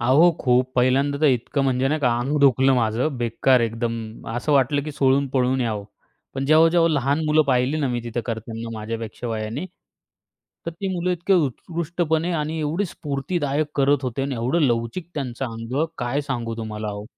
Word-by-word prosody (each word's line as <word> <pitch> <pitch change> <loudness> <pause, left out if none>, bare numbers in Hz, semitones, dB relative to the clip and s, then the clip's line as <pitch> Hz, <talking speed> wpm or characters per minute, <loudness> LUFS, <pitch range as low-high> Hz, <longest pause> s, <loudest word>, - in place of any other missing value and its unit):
अहो, 140 +9 +5
खूप 125 0 +2
पहिल्यांदा 135 +3 +2
तर 155 - +4
इतकं 135 +2 +1
म्हणजे 130 0 +1
नाही 155 +2 0
का 120 -3 +2
अंग 140 +5 -1
दुखलं 135 -1 +5
माझं, 125 +5 0
बेकार 120 +2 +2
एकदम, 115 -1 -3
असं 120 +6 -1
वाटलं, 140 +1 +3
की 150 0 -6
सोडून 140 -1 +2
पळून 130 0 +1
यावं. 110 -4 -2 0.5
पण 135 0 -2
जेव्हा-जेव्हा 165 +2 +5
लहान 140 +3 +1
मुलं 155 +1 +4
पाहिली 130 +3 +2
ना 140 - +1
मी 120 -1 -1
तिथं 120 0 -3
करतांना 115 0 -5
माझ्यापेक्षा 115 +2 -5
वयाने, 115 +9 -3 1.0
तर - - -1
ती 190 +4 -5
मुलं 180 +1 -1
इतकी 175 +3 0
उत्कृष्टपणे 170 +2 0
आणि 155 0 -2
एवढे 160 +7 -1
स्फूर्तिदायक 145 0 -2
करत 140 0 +3
होते 130 +1 -2
आणि 135 -1 -2
एवढं 125 +9 0
लवचिक 120 +6 0
त्यांचं 135 -3 -3
अंग. 115 +6 -2
काय 125 +4 -1
सांगू 120 -5 -3
तुम्हाला 110 -2 -4
ओ. 105 +1 -7
135 Hz, 170 wpm, -23 LUFS, 120-150 Hz, 1.0 s, अहो